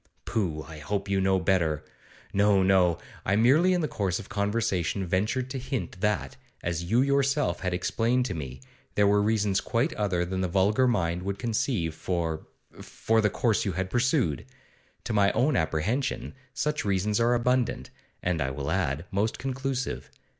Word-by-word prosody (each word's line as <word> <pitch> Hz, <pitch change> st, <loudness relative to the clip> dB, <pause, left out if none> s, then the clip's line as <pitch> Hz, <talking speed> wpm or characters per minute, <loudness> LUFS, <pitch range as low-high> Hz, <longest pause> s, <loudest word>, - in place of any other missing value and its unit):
Pooh, 90 Hz, -10 st, -1 dB
I 80 Hz, -1 st, -10 dB
hope 100 Hz, +6 st, -3 dB
I 100 Hz, -, -1 dB
know 95 Hz, 0 st, +3 dB
you 90 Hz, -, -3 dB
better! 85 Hz, -5 st, +1 dB, 0.5 s
No, 100 Hz, -1 st, +4 dB
no; 95 Hz, -3 st, +4 dB, 0.3 s
I 95 Hz, -, +1 dB
merely 140 Hz, -, +5 dB
in 180 Hz, -1 st, +2 dB
the 155 Hz, -, 0 dB
course 95 Hz, -8 st, -1 dB
of 105 Hz, -, -9 dB
conversation 100 Hz, -4 st, 0 dB
ventured 105 Hz, +8 st, 0 dB
to 135 Hz, -, -3 dB
hint 125 Hz, -7 st, -4 dB
that, 105 Hz, -1 st, -1 dB, 0.3 s
as 85 Hz, -1 st, -2 dB
you 115 Hz, +8 st, +3 dB
yourself 140 Hz, -, +1 dB
had 90 Hz, -, -2 dB
explained 115 Hz, +7 st, +1 dB
to 105 Hz, -, -2 dB
me, 65 Hz, -5 st, -6 dB, 0.3 s
there 105 Hz, -, +4 dB
were 100 Hz, 0 st, +4 dB
reasons 105 Hz, -2 st, +1 dB
quite 130 Hz, +8 st, 0 dB
other 90 Hz, -4 st, 0 dB
than 95 Hz, +1 st, -2 dB
the 95 Hz, -, +1 dB
vulgar 100 Hz, +8 st, +3 dB
mind 90 Hz, -7 st, 0 dB
would 100 Hz, +1 st, -3 dB
conceive 110 Hz, -, -1 dB
for 80 Hz, -1 st, -3 dB, 0.3 s
for 110 Hz, 0 st, 0 dB
the 105 Hz, -, +3 dB
course 110 Hz, +2 st, +1 dB
you 100 Hz, -, -1 dB
had 95 Hz, +2 st, -3 dB
pursued. 120 Hz, -, +1 dB, 0.6 s
To 120 Hz, -, -3 dB
my 100 Hz, -1 st, +4 dB
own 145 Hz, +4 st, +2 dB
apprehension 90 Hz, -, -1 dB, 0.2 s
such 150 Hz, +3 st, -1 dB
reasons 100 Hz, +2 st, +1 dB
are 120 Hz, +1 st, +3 dB
abundant, 125 Hz, +1 st, 0 dB, 0.3 s
and, 90 Hz, -3 st, 0 dB
I 65 Hz, -, 0 dB
will 70 Hz, +1 st, -4 dB
add, 70 Hz, +5 st, -1 dB
most 105 Hz, +3 st, 0 dB
conclusive. 135 Hz, 0 st, -3 dB
100 Hz, 175 wpm, -27 LUFS, 90-120 Hz, 0.6 s, merely